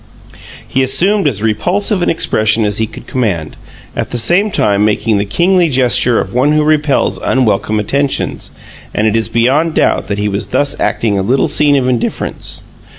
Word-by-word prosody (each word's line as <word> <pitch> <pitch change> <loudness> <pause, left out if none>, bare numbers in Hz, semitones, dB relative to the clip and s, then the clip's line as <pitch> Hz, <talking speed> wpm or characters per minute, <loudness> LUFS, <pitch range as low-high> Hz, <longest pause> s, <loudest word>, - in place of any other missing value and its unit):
He 135 - -1
assumed 175 +9 +2
as 110 -7 -2
repulsive 180 - 0
an - - +1
expression 110 -7 +1
as 105 0 -1
he 110 - 0
could - - -12
command, 100 - -3 0.4
at - - -3
the 120 - -3
same 175 - +3
time 100 - +1
making 105 0 0
the 100 - -1
kingly 175 - +1
gesture 125 -2 +2
of - - -4
one 135 +5 +2
who 155 0 +2
repels 150 -2 +1
unwelcome 110 -4 0
attentions; 140 +6 -2 0.5
and 105 - 0
it 110 0 +1
is 115 -1 0
beyond 135 +8 +1
doubt - - +1
that 100 - -3
he 105 0 -1
was 100 0 -2
thus 145 0 0
acting 105 -4 0
a - - 0
little 125 +8 +1
scene 145 -1 +3
of 130 -2 0
indifference. 125 -3 -3
125 Hz, 180 wpm, -13 LUFS, 105-150 Hz, 0.5 s, same